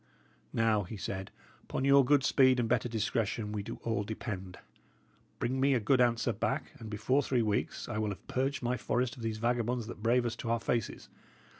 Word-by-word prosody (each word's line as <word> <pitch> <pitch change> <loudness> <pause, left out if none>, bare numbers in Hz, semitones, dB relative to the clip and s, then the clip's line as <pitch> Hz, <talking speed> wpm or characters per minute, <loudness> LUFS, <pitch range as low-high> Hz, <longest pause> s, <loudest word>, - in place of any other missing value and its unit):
"Now," 110 -2 +2
he 105 +3 -7
said, 95 0 -4 0.3
"upon 130 - -3
your 140 0 +7
good 140 +1 +4
speed 130 -2 +4
and 120 - +1
better 120 - +1
discretion 110 -1 -1
we 105 -1 -2
do 100 - -6
all 115 -3 0
depend. 100 -4 -5 0.8
Bring 130 +2 -1
me 135 0 +4
a - - +2
good 125 +4 +3
answer 120 -1 +2
back, 110 +1 -2
and 110 -2 -8
before 110 +6 +1
three 125 -4 +1
weeks, 105 -2 -1
I 110 -3 -3
will 110 -1 0
have 100 - -8
purged 135 +1 -1
my 125 +1 0
forest 120 +2 -1
of - - -9
these 110 -1 -2
vagabonds 120 +1 0
that 110 -2 -8
brave 120 +2 +3
us 120 - -1
to 115 - -5
our 115 0 +2
faces. 115 -1 -2
115 Hz, 200 wpm, -31 LUFS, 110-125 Hz, 0.8 s, your